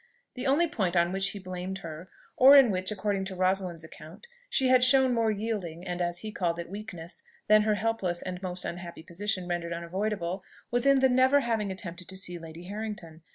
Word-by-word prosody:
The 250 +1 -4
only 300 +6 +3
point 190 - -1
on 170 0 +3
which 195 +1 +1
he 205 - -6
blamed 185 0 -5
her, 165 +3 -8 0.3
or 270 +2 +8
in 260 -5 +7
which, 185 +1 0
according 200 -1 -1
to 190 -1 -6
Rosalind's 185 -2 0
account, 160 - -12 0.2
she 265 - +2
had 255 -1 +6
shown 260 0 +5
more 230 -2 +2
yielding, 200 -5 -3
and, 180 0 -3
as 175 0 -2
he 215 - -5
called 170 -4 -1
it, 170 +1 -6
weakness 195 -5 -7 0.3
than 215 0 +6
her 210 0 +2
helpless 200 -5 -1
and 180 0 -5
most 180 -1 -1
unhappy 170 -2 -6
position 185 +2 -3
rendered 170 -1 -2
unavoidable, 185 +1 -3 0.3
was 245 +2 +1
in 275 -1 +5
the 265 - +6
never 260 +3 +4
having 225 -5 -1
attempted 180 -2 -7
to 190 - -7
see 180 -2 -3
Lady 165 +1 -10
Harrington. 200 -5 -6
190 Hz, 200 wpm, -28 LUFS, 175-220 Hz, 0.3 s, or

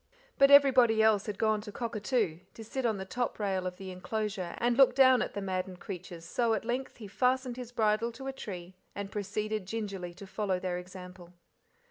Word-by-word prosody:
But 275 - +7
everybody 255 -6 +6
else 215 -2 +3
had 205 -2 -4
gone 215 -1 +1
to 210 0 -8
"cockatoo" 215 -5 -1 0.2
to 225 - -8
sit 245 +3 -2
on 220 -3 0
the 190 - -5
top 245 +5 -2
rail 190 -3 -1
of 180 0 -6
the 190 -1 -7
enclosure 195 -1 -3
and 240 0 +1
look 260 -1 +6
down 260 -2 +6
at - - -3
the 200 - -3
maddened 185 -1 -3
creatures, 175 -3 -8
so 230 +5 +1
at 220 - -4
length 250 +3 -3
he 220 -4 -9
fastened 255 +4 0
his 245 -2 -7
bridle 220 0 +1
to 265 +3 -9
a 270 - -3
tree 185 -7 -7 0.2
and 200 -1 -5
proceeded 210 0 -3
gingerly 195 -5 -4
to 200 - -10
follow 195 -1 -2
their 180 -1 -2
example. 180 -1 -11
210 Hz, 200 wpm, -30 LUFS, 185-240 Hz, 0.2 s, But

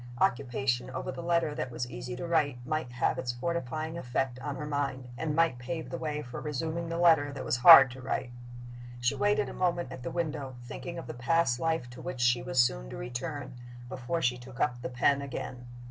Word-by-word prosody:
Occupation 125 -1 +1
over 130 - -4
the - - -6
letter 170 -3 +1
that 140 - -3
was 120 0 -4
easy 120 0 -6
to 130 - -5
write 155 -6 +1
might 155 -3 -2
have 125 - +1
its 125 - -1
fortifying 160 +3 -3
effect 125 -1 -2
on 145 +1 -4
her 150 - -5
mind, 140 -3 -2
and 150 +3 -2
might 165 -6 +3
pave 155 +6 -5
the 170 - -3
way 150 -1 -3
for 125 0 -7
resuming 160 +3 -3
the 165 - -2
letter 160 -4 +5
that 140 -2 -6
was 120 - +1
hard 135 -1 +10
to 130 +1 -9
write. 125 -1 -2 0.7
She 125 0 +2
waited 205 0 +2
a - - -6
moment 175 -6 0
at 130 - -7
the 125 - -4
window, 150 -6 -3
thinking 170 +7 -7
of 165 - -6
the - - -6
past 125 0 +2
life 160 -5 0
to 120 - -10
which 130 - -5
she 120 -1 +3
was 125 +1 -1
soon - - +2
to - - -7
return, 130 +2 -5 0.4
before 130 +7 -3
she 125 0 +1
took 125 +1 -11
up 120 -4 0
the - - -4
pen 140 +3 +2
again. 125 -2 -6
135 Hz, 215 wpm, -30 LUFS, 125-160 Hz, 0.7 s, hard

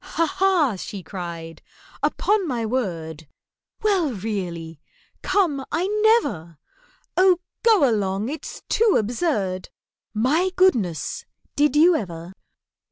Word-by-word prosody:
"Ha! 330 - +4
ha!" 335 - +2
she 195 0 -7
cried. 170 -2 -7 0.4
"Upon 410 -3 +1
my 240 -5 -2
word! 165 - -3 0.6
Well, 380 -9 +2
really—come, 205 - -3
I 345 - 0 0.4
never! 165 0 -6 0.6
Oh, 370 -1 +5 0.2
go 435 -11 +5
along, 205 -2 0
it's 305 +4 -7
too 450 -3 +3
absurd! 210 - -1 0.4
My 280 - +1
goodness! 235 - +1 0.3
Did 295 -1 +2
you 335 +4 +6
ever? 175 - -5
230 Hz, 100 wpm, -23 LUFS, -, 0.6 s, you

